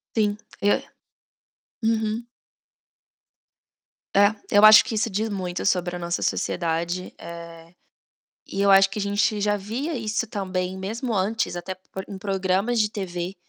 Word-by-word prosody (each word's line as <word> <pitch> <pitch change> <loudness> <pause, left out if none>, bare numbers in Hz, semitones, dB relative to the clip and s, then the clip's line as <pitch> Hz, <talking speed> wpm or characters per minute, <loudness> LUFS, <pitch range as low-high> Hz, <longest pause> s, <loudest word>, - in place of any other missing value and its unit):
Sim. 210 -2 +1 0.2
Eu 205 0 +3 1.0
Uhum. 220 0 0 1.9
É. 205 +2 +6 0.2
Eu 205 +1 +5
acho 215 0 +10
que 240 - -3
isso 220 +2 0
diz 215 +2 -1
muito 185 -3 -4
sobre 180 -2 +1
a - - -5
nossa 170 0 -2
sociedade. 170 +2 -1
Eh, 170 0 -10 0.7
e 195 - -4
eu 200 0 +4
acho 195 0 +6
que 195 - -5
a - - -1
gente 205 +1 +1
já 205 0 +2
via 235 +11 -4
isso 225 0 -2
também 185 -4 -3
mesmo 225 +5 -3
antes, 200 0 0
até 175 +2 -5 0.2
por 190 - -6
em 195 - -8
programas 195 +3 0
de 210 -1 +2
TV 180 -3 -4
200 Hz, 145 wpm, -24 LUFS, 185-215 Hz, 1.9 s, acho